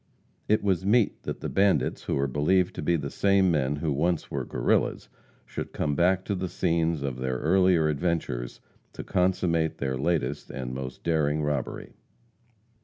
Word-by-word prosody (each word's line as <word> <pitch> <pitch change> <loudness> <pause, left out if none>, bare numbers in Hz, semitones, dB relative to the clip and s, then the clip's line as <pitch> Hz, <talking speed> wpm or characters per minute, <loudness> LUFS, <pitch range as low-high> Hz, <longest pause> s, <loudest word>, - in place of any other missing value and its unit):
It 105 0 +2
was 95 -3 +1
meet 110 +2 +2
that - - -4
the - - -3
bandits, 100 0 +1
who - - -1
are 70 - +1
believed 75 +7 +1
to - - -6
be 85 - +2
the 70 -3 -3
same 100 -2 +3
men 75 -3 +1
who 75 +1 -2
once 80 +4 0
were - - -2
Guerrillas, - - 0 0.4
should - - -6
come 75 - -1
back 90 +5 +2
to 100 - -1
the 95 -1 -3
scenes 80 -3 0
of 65 -3 -3
their 65 0 -2
earlier 90 -1 +3
adventures, 75 -6 -2 0.3
to - - -7
consummate 90 -3 +1
their 65 -1 -2
latest 75 -2 -1
and 65 -2 -5
most 65 0 -6
daring 75 -2 +1
robbery. 75 -3 -3
80 Hz, 170 wpm, -27 LUFS, 70-90 Hz, 0.4 s, same